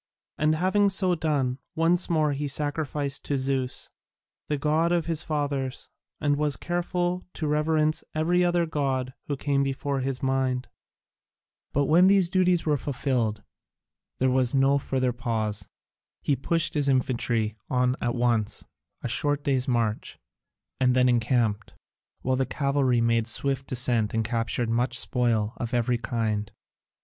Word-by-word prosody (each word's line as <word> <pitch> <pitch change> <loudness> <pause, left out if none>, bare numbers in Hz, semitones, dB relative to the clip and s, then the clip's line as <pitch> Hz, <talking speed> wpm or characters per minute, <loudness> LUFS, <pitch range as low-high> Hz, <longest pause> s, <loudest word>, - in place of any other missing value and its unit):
And 155 +1 +3
having 190 +4 +3
so 190 -2 +2
done, 145 -6 0 0.2
once 170 +2 +2
more 155 -3 +2
he 145 +1 -2
sacrificed 145 -1 -2
to 140 - 0
Zeus, 130 -1 -1 0.6
the 150 - -1
god 155 +4 +1
of 175 -2 +1
his 165 -2 -1
fathers, 145 -4 -3 0.3
and 145 -1 +1
was 150 -1 0
careful 175 +1 -2
to 160 - -3
reverence 155 +1 +1
every 175 +3 +2
other 175 -1 +2
god 135 -5 -1
who 145 - -2
came 140 0 0
before 140 0 -1
his 130 0 -3
mind. 130 -1 0 1.0
But 145 0 +1
when 170 +6 +5
these 190 -3 +4
duties 180 -2 +2
were 150 -2 +2
fulfilled, 120 -6 -1 0.7
there 130 0 +2
was 130 0 +2
no 135 +1 +4
further 130 -2 -1
pause. 110 -4 -3 0.5
He 145 - +2
pushed 165 +6 0
his 145 -2 +1
infantry 120 -4 0
on 125 0 +2
at 120 +1 -1
once, 120 -3 0 0.4
a - - -1
short 145 +4 0
day's 135 -3 +1
march, 115 -4 -1 0.6
and 125 -1 +3
then 125 0 +4
encamped, 115 -4 0 0.5
while 130 0 +1
the 135 -1 0
cavalry 140 -3 +1
made 115 -1 +2
a - - -3
swift 135 +2 -1
descent 120 -4 +1
and 115 -1 0
captured 115 +1 -1
much 120 +2 0
spoil 115 -4 +1
of 120 0 -3
every 120 0 +1
kind. 110 -4 -2
135 Hz, 150 wpm, -26 LUFS, 125-155 Hz, 1.0 s, when